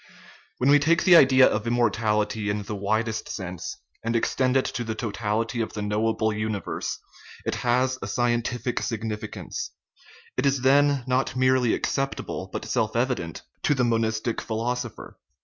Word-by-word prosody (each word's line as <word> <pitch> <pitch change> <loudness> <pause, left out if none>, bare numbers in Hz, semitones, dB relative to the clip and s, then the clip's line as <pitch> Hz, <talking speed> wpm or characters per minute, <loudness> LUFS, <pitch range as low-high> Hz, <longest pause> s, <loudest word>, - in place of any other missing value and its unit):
When 130 +3 +3
we 145 - +7
take 165 +4 +3
the 180 - +7
idea 130 -4 +7
of 110 +2 -1
immortality 110 -2 +1
in 105 0 -1
the 105 - -5
widest 110 +2 -1
sense, 90 -3 -5 0.3
and 115 +1 -1
extend 130 +3 +2
it 130 - +1
to 120 - -3
the 110 -1 -4
totality 115 +1 -2
of 110 - -3
the 105 - -4
knowable 110 +1 0
uni 105 -1 -2
verse, - - -4 0.5
it - - 0
has 130 +2 +1
a - - -4
scientific 120 0 0
significance; 110 -1 -4 0.7
it - - +2
is 135 -2 +1
then 140 0 +4
not 130 +1 0
merely 130 -2 +3
acceptable, 135 0 -3
but - - -4
self - - -1
evident, - - -1 0.2
to 145 - +2
the 130 - +1
monistic 115 -1 0
philosopher. 120 +1 -4
115 Hz, 155 wpm, -25 LUFS, 110-130 Hz, 0.7 s, we